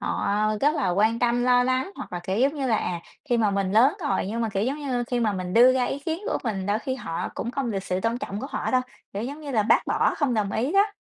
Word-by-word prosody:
Họ, - - -2
ơ, 210 +1 +1
rất 295 +2 +3
là 285 - 0
quan 215 +5 +2
tâm 240 0 +1
lo 245 0 +5
lắng, 260 +6 0
hoặc 260 - -8
là, 175 - -2
kiểu 190 +3 -1
giống 275 +4 +3
như 280 -3 -2
là, 230 -3 +2
à, 175 -4 -2 0.3
khi 240 - +4
mà 220 -3 +2
mình 195 -1 -1
lớn 245 +8 +5
rồi, 290 - 0
nhưng 225 +4 -3
mà, 225 - 0
kiểu 195 -1 -1
giống 270 +5 -1
như, 255 -5 -2
khi 245 0 -1
mà 220 -3 +1
mình 185 -2 -4
đưa 245 +3 +7
ra 255 -1 +1
ý 270 - -2
kiến 320 +4 -3
của - - 0
mình 195 -5 -2
đôi 205 +1 +1
khi 260 +3 -3
họ 165 -10 -4
cũng 235 - -3
không 255 -2 -2
được 195 -3 -2
sự 185 -1 -1
tôn 230 +4 -1
trọng 210 -6 -5
của 270 - -4
họ - - -2
đâu, 255 - +3 0.3
kiểu 200 - -3
giống 280 +6 -5
như 295 -2 -6
là, 220 -5 +2
bác 210 - +3
bỏ - - +1
không 280 -6 +1
đồng 205 -2 0
ý 255 +8 0
đó, 400 +1 +5
235 Hz, 305 wpm, -25 LUFS, 205-265 Hz, 0.3 s, đưa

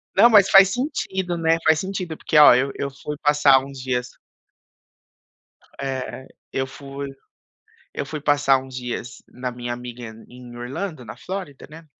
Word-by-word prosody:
Não, 235 - +7
mas 205 -3 +6
faz 195 0 +7
sentido, 190 - -3
né, 165 0 +2
faz 160 0 +4
sentido, 185 -4 -4
porque 155 - 0
ó, 150 - +9
eu 135 +2 +1
eu 140 - -3
fui 150 +2 -7
passar 145 -2 +5
uns 135 -1 -10
dias 125 -1 -2 1.7
É. 130 -1 -5 0.2
Eu 135 0 -2
fui 140 0 -8 0.9
eu - - -2
fui 150 +1 -6
passar 145 -2 +3
uns 130 0 -10
dias 125 0 -6
na 125 0 -6
minha 120 0 -5
amiga 120 0 -8 0.3
em 125 -1 -12
Orlando, 140 +4 -6
na 110 - -9
Flórida, 185 -8 -7
né. 160 +1 -13
140 Hz, 155 wpm, -22 LUFS, 125-165 Hz, 1.7 s, ó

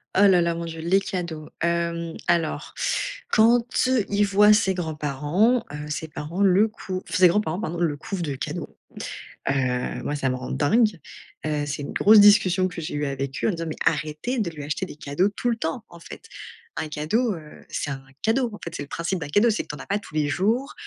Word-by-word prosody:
Oh 200 +1 +6
là, 185 -2 +5
là, 170 0 +1
mon 170 0 -4
Dieu, 165 -1 -7
les 175 +4 +3
cadeaux. 170 -5 -5
Hem, 170 -1 -1
alors 170 -2 0 0.6
quand 230 +2 +5 0.4
il 205 0 +2
voit 205 +1 +6
ses 205 -3 +2
grands-parents, 160 - 0
heu, 150 0 -6
ses 155 +2 -3
parents 155 +4 -5
le 195 +3 +5
cou 190 -4 -6
ses 180 0 +5
grands-parents 175 -1 0
pardon, 175 -5 -3
le 160 -4 0
couvent 190 +4 -5
de 145 -5 -2
cadeaux. - - -6 0.7
Heu, 130 -2 -1
moi 145 - -2
ça 135 -2 0
me 130 - -1
rend 125 0 -6
dingue. 210 +5 +2 0.5
Heu, 150 -1 -1
c'est 145 0 -4
une - - -6
grosse 215 +1 +7
discussion 190 -3 +6
que 180 -2 -6
j'ai 155 - -5
eue 145 0 -1
avec 135 -1 -3
eux - - +3
en - - +3
disant: 165 -2 -4
«Mais 155 - -5
arrêtez 155 +12 0
de 205 -6 0
lui 150 -3 -8
acheter 155 +6 -2
des 160 - -11
cadeaux 150 +6 0
tout 240 +4 -2
le 235 - +1
temps 210 +2 -4
en 170 - -14
fait», - - -10 0.5
un - - -2
cadeau, 205 +11 0
heu, 155 -4 -11
c'est 145 - -3
un 135 -1 -6 0.2
cadeau. 235 +2 +1
En 210 - -9
fait, 170 - -6
c'est 145 - -4
le - - -11
principe 175 +2 -2
d'un 150 - -5
cadeau, 205 +9 +4
c'est 220 - 0
que - - -22
tu 150 - -4
n'en - - -8
as - - -16
pas 200 +1 0
tous 180 - -13
les 150 -1 +1
jours. 225 - 0
170 Hz, 225 wpm, -24 LUFS, 150-205 Hz, 0.7 s, grosse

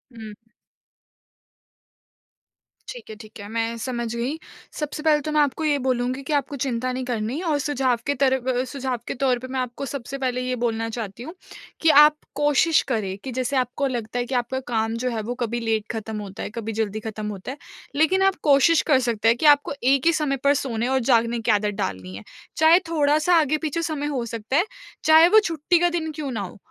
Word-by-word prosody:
हुँ। 220 -2 -9 2.6
ठीक - - -9
है, 220 - -7
ठीक 215 -1 -13
है, 205 - -8
मैं 230 +1 -2
समझ 235 -2 -3
गई। 250 +6 -2 0.4
सबसे 300 0 -4
पहले 300 -2 +3
तो - - -1
मैं 305 - +2
आपको 290 +2 0
ये 290 -1 +2
बोलूँगी 255 +1 0
कि - - +1
आपको 280 - -8
चिंता 255 0 -2
नहीं 255 0 -4
करनी 240 +6 -2
और 295 - +2
सुझाव 260 -4 +1
के 285 - +2
तर 265 -1 +4
अ, 255 -1 0
सुझाव 265 -3 -3
के - - -2
तौर 250 -2 +2
पे 255 - -8
मैं - - 0
आपको 255 +2 -4
सबसे 275 0 -5
पहले 250 -1 -1
ये 250 0 -2
बोलना 225 -1 -1
चाहती 220 0 -6
हूँ, 320 - -8 0.5
कि 325 - +4
आप 300 0 +5 0.2
कोशिश 295 +2 +3
करें 195 -4 -2
कि 265 - -5
जैसे 265 +2 -1
आपको 255 +2 0
लगता 240 -2 -3
है 245 - -1
कि 260 - -4
आपका 260 +2 -4
काम 225 0 0
जो - - +2
है, 225 -2 -2
वो 235 +3 -4
कभी 235 +1 -2
लेट 220 -2 -1
खत्म 220 -1 -5
होता 195 -2 -7
है, - - -4
कभी 225 -1 -3
जल्दी 215 0 -1
खत्म 215 -1 -5
होता 200 +5 -6
है, 275 - -8 0.4
लेकिन 320 +6 +3
आप 385 - -6 0.2
कोशिश 295 +4 +5
कर 265 - +6
सकते 225 -1 0
हैं 230 - +4
कि 310 - -2
आपको 285 - -7 0.2
एक 275 +3 0
ही 335 - +5
समय 290 -4 0
पर 285 - +6
सोने 235 -2 -2
और - - +3
जागने 235 0 +2
की 225 0 +1
आदत 210 0 +1
डालनी 95 - -5
है। 100 - -9 0.3
चाहे 320 +3 +6
थोड़ा-सा 310 +2 +3
आगे-पीछे 310 +2 -1
समय 310 -3 -3
हो 240 -2 -2
सकता 230 +4 -2
है, 355 - +3 0.4
चाहे 320 +2 +7
वो 435 - +7
छुट्टी 330 +2 +1
का 350 0 +3
दिन 325 -2 -2
क्यों 295 -3 -5
ना 220 -4 -3
हो, 185 - -8
255 Hz, 215 wpm, -23 LUFS, 225-295 Hz, 2.6 s, चाहे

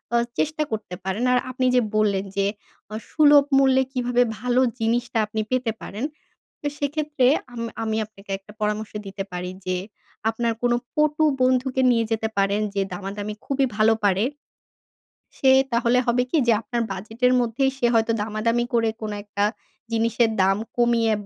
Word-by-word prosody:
আ - - +5 0.2
চেষ্টা 310 0 0
করতে 210 -4 -4
পারেন। 195 +5 -2
আর 250 - +4
আপনি 255 0 -1
যে 250 - +5
বললেন 200 -2 +2
যে 195 - +2 0.5
আ - - -3 0.2
সুলভ 295 -2 +6
মূল্যে 265 -1 +4
কিভাবে 245 -1 +2 0.2
ভালো 250 +1 +2 0.2
জিনিসটা 235 +1 0
আপনি 215 +1 -3
পেতে 255 -3 +1
পারেন 210 +5 -6 0.6
তো - - -6
সেক্ষেত্রে 295 -2 0 0.3
আম 235 - -6 0.2
আমি 220 -1 -1
আপনাকে 200 -1 -16
একটা 195 +2 -16
পরামর্শ 210 +1 -2
দিতে 195 0 -5
পারি 180 0 -4 0.2
যে 185 0 0 0.5
আপনার 230 +1 -1
কোন 245 - +2 0.2
পটু 305 +1 +2 0.2
বন্ধুকে 255 +1 +2
নিয়ে 230 -2 +2
যেতে 220 0 0
পারেন 200 +1 +2
যে 200 - 0
দামাদামি 200 +3 -5
খুবই 275 -1 +1
ভালো 220 +1 +4
পারে। 195 +2 +2 1.1
সে 265 - +4 0.2
তাহলে 235 +1 +3
হবে 245 +1 +2
কি? 320 - +2
যে 235 - +5
আপনার 240 -3 -2
বাজেটের 225 +6 0
মধ্যেই 245 +3 +1
সে 240 - +2
হয়তো 225 0 +3
দামাদামি 225 +3 0
করে 230 -1 +3
কোন 215 -1 -4
একটা 205 0 -1 0.5
জিনিসের 230 0 +2
দাম 195 +1 +3 0.2
কমিয়ে 235 -2 +3
230 Hz, 160 wpm, -23 LUFS, 210-250 Hz, 1.1 s, সুলভ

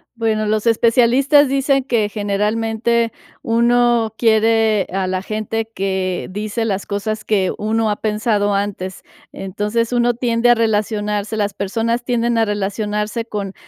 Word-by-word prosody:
Bueno, 220 -2 0
los 215 +1 0
especialistas 250 +5 +4
dicen 275 0 +1
que, 225 -5 +1
generalmente, 220 +3 0 0.3
uno 235 -1 +2
quiere 220 -2 +3
a 190 0 -1
la 185 0 -2
gente 220 +2 -4
que 190 -1 -2
dice 210 +4 -3
las 200 -3 -2
cosas 215 +2 -3
que 195 -4 0
uno 220 +1 0
ha 210 - 0
pensado 210 -1 0
antes. 195 -2 -3 0.3
Entonces, 210 +5 -2
uno 240 0 +2
tiende 235 0 +1
a 240 - +6
relacionarse, 210 -1 -1
las 205 -1 -1
personas 230 +5 -2
tienden 240 -1 0
a 225 - +3
relacionarse 210 +2 -2
con 200 -4 -5
220 Hz, 135 wpm, -18 LUFS, 205-230 Hz, 0.3 s, a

